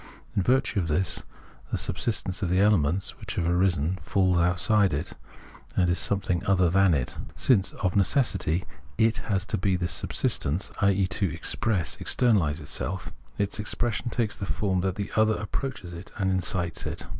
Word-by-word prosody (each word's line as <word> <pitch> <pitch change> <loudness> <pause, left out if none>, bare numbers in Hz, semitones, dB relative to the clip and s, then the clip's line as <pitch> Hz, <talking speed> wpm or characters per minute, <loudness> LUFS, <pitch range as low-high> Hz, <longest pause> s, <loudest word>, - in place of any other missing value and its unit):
In - - +2
virtue 125 +1 +2
of 85 - -1
this, 85 +4 0 0.5
the - - 0
subsistence 95 -1 -1
of 95 - 0
the 90 +1 +2
elements 95 -3 +2
which - - -6
have 85 - 0
arisen 90 -1 +1
falls 95 -3 +2
outside 90 +1 +3
it, 75 - -3 0.6
and 90 -2 +3
is 85 - +2
something 95 -3 0
other 90 -3 +3
than 95 -2 +4
it. 65 -4 -3 0.2
Since 105 -8 +3
of 90 -2 -2
necessity 95 - +1 0.3
it 110 0 +3
has 100 -3 -1
to 100 - -2
he 95 -1 +2
this 85 -3 -1
subsistence, 75 +7 +1
i.e. 100 -1 +3
to 95 -1 +1
express, 95 +1 -1
externaUse 95 -11 +2
itself, 85 +5 -5 0.3
its 100 0 -2
expression 120 +3 -2
takes 115 -2 -1
the 100 - -5
form 95 -3 0
that 95 0 -1
the 100 0 -4
other 110 0 +4
approaches 105 -3 -5
it 85 +3 -9
and 95 -2 +1
incites 90 -3 -2
it. - - -5
95 Hz, 170 wpm, -27 LUFS, 90-105 Hz, 0.6 s, than